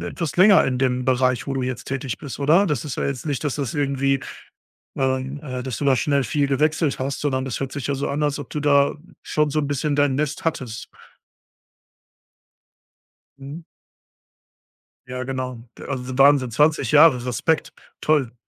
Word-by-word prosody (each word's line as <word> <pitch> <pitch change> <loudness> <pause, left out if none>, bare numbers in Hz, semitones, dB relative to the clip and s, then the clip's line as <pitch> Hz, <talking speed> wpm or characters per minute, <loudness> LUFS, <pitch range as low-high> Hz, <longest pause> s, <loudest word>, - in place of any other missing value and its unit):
etwas 140 - -4
länger 195 +2 +6
in 130 -1 -1
dem 125 -1 0
Bereich, 130 -1 +1
wo 140 - -3
du 130 - -2
jetzt 125 -1 -4
tätig 135 -3 -4
bist, 140 - -8
oder? 160 +8 +4
Das 150 -6 -1
ist 145 - -5
ja - - -2
jetzt 135 -2 -4
nicht, 145 -1 -2
dass 145 -2 -1
das 135 -6 -3
irgendwie 135 -1 0 0.8
ähm, 130 +1 -1
äh, 130 -3 -5
dass 130 -5 -4
du 145 - -3
da 135 -2 +4
schnell 140 +2 +1
viel 140 +4 0
gewechselt 150 +1 0
hast, 135 +1 -3
sondern 130 -3 -1
das 130 -3 -4
hört 135 -1 -4
sich 140 -2 -5
ja 140 - 0
so 140 - -2
an, 145 +2 -2
als 145 0 0
ob 145 - -8
du 150 - -3
da 140 -1 +3 0.3
schon 150 -1 0
so 155 - -1
'n 145 - 0
bisschen 145 +1 -1
dein 145 -2 +2
Nest 150 +1 -2
hattest. 125 -8 -3 2.5
Mhm. 140 +5 -9 1.4
Ja, 125 0 -5
genau. 130 -1 -4 0.2
D - - -12
also, 130 -2 -5
Wahnsinn, 140 -2 +5
20 150 0 +2
Jahre. 145 -5 +6
Respekt. 155 +6 0 0.3
Toll. 140 -6 +1
140 Hz, 180 wpm, -22 LUFS, 130-145 Hz, 2.5 s, länger